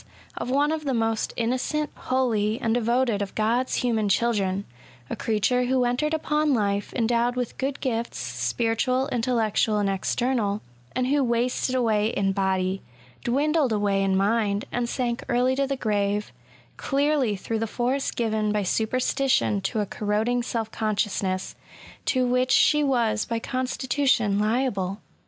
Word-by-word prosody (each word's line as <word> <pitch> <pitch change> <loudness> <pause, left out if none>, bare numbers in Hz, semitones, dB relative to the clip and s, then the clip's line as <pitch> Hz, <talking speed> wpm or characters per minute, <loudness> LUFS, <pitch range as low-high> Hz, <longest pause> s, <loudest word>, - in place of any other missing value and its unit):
of - - -4
one 285 +3 +2
of 315 -1 -2
the 270 -3 -1
most 225 -1 0
innocent, 255 +6 -1
holy, 230 -4 0
and 225 -4 0
devoted 240 -2 +1
of 200 - -4
God's 235 +4 +1
human 225 -4 +1
chil 235 +5 +2
dren; 195 -1 -1 0.5
a - - -1
creature 230 +3 +1
who 255 0 +2
entered 245 +5 0
upon 300 -2 +1
Ufe 200 -2 -1
endowed 240 +1 +1
with 250 -2 -3
good 270 +1 -2
gifts, 235 -3 -2
spiritual, 245 +3 0
intellectual, 225 -3 +1
and 205 -1 +1
external, 210 +1 0 0.3
and 255 0 +1
who 280 +2 +2
wasted 245 +2 0
away 220 -4 +2
in 200 -3 0
body, 190 -1 0 0.4
dwindled 285 +2 +1
away 205 -2 +1
in 195 -1 +2
mind, 205 0 +1
and 240 -1 -1
sank 240 -2 -2
early 250 +1 +2
to 275 0 0
the 275 0 -2
grave, 205 -2 -1 0.5
clearly 280 -5 +1
through 220 +3 -3
the 225 - -1
force 255 +5 -1
given 220 -2 0
by 210 -1 0
superstition 250 +1 +1
to 210 +3 -1
a - - -1
corroding 215 +5 0
self 225 -2 -3
consciousness, 200 -3 -1 0.5
to 255 -2 +2
which 250 +1 +1
she 300 +3 +4
was 235 -6 +1
by 230 - -2
constitution 255 -3 0
liable. 210 -4 0
235 Hz, 150 wpm, -25 LUFS, 210-255 Hz, 0.5 s, she